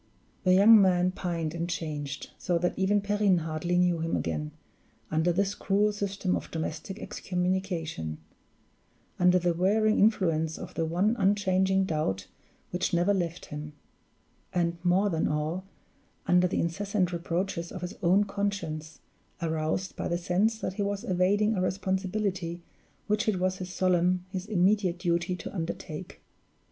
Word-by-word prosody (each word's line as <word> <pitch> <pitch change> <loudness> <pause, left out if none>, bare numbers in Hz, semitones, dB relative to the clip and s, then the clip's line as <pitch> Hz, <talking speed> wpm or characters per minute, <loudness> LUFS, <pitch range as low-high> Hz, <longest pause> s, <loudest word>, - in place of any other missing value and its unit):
The 185 0 +6
young 210 +3 +8
man 180 -1 +3
pined 170 -4 -3
and 170 0 -3
changed, 150 -4 -4
so 175 - +1
that 175 +1 0
even 200 +2 +2
Perrine 200 -3 +2
hardly 160 +3 -1
knew 180 -2 +3
him 165 +1 -1
again, 75 -2 -2 0.6
under 160 +3 +2
this 195 +3 +1
cruel 205 +2 +1
system 200 -2 -1
of - - -5
domestic 160 +4 -4
excommunication; 180 - -2 1.0
under 180 0 +5
the 175 -1 +1
wearing 215 +5 +2
influence 165 -7 +2
of 185 0 -8
the 165 - -1
one 185 +8 +1
unchanging 190 -1 +2
doubt 150 - -1 0.5
which 180 0 0
never 175 +4 +3
left 175 -3 -2
him; 150 0 -7 0.8
and, 170 -1 0
more 190 +3 +3
than 165 -1 +1
all, 155 +5 -2 0.6
under 180 0 +4
the - - -1
incessant 185 +1 0
reproaches 170 0 -2
of 185 - -7
his 180 +2 -4
own 185 +4 +4
conscience, 195 -6 -3 0.4
aroused 160 +2 -2
by - - -3
the 170 - 0
sense 190 +6 +1
that - - -2
he 205 - -3
was 200 +1 -1
evading 205 +1 +2
a 190 - -1
responsibility 190 -1 -2 0.4
which 210 +1 0
it 205 - 0
was 185 0 0
his 185 -1 -6
solemn, 180 -1 +2
his 185 +1 -4
immediate 190 -2 +2
duty 175 0 0
to - - -8
undertake. 165 -1 -5
180 Hz, 150 wpm, -28 LUFS, 170-195 Hz, 1.0 s, young